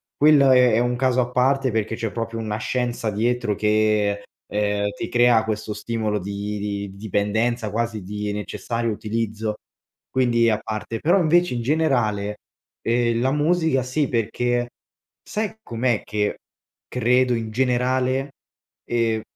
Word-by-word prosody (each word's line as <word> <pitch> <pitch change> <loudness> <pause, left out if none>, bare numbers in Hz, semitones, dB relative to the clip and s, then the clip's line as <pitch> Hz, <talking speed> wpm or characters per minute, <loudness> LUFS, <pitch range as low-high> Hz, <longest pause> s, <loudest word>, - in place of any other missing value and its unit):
quello 145 -2 +6
è 125 -2 +5
è 110 - +4
un 120 0 +1
caso 130 0 +2
a 125 0 -3
parte 130 +1 +2
perché 110 0 -1
c'è 115 -2 -3
proprio 115 0 -4
una 110 -2 -3
scienza 120 -1 -2
dietro 115 +1 0
che, 105 -1 +1 0.2
ehm, 105 0 0
ti 115 - -5
crea 120 -2 +4
questo 110 -1 -3
stimolo 105 0 -2
di 100 +2 -4
di 100 -1 -3
dipendenza 110 +3 -1
quasi 110 -1 -2
di 105 +2 -4
necessario 115 +3 -3
utilizzo, 110 0 -3 0.5
quindi 120 -3 +3
a 105 - 0
parte. 110 +1 -5
Però 170 - +3
invece, 175 -1 +3
in 120 - -2
generale, 115 -8 +1 0.5
uhm, 120 0 +1
la 130 +2 +2
musica 160 -1 +2
sì, 130 +3 -1
perché, 120 +1 0 0.6
sai 215 0 -3
com'è 120 -1 0
che 105 -1 -1 0.5
credo 125 +2 +2
in 115 -1 -3
generale, 130 +2 +1 0.5
ehm, 115 -2 0
115 Hz, 140 wpm, -23 LUFS, 105-125 Hz, 0.6 s, quello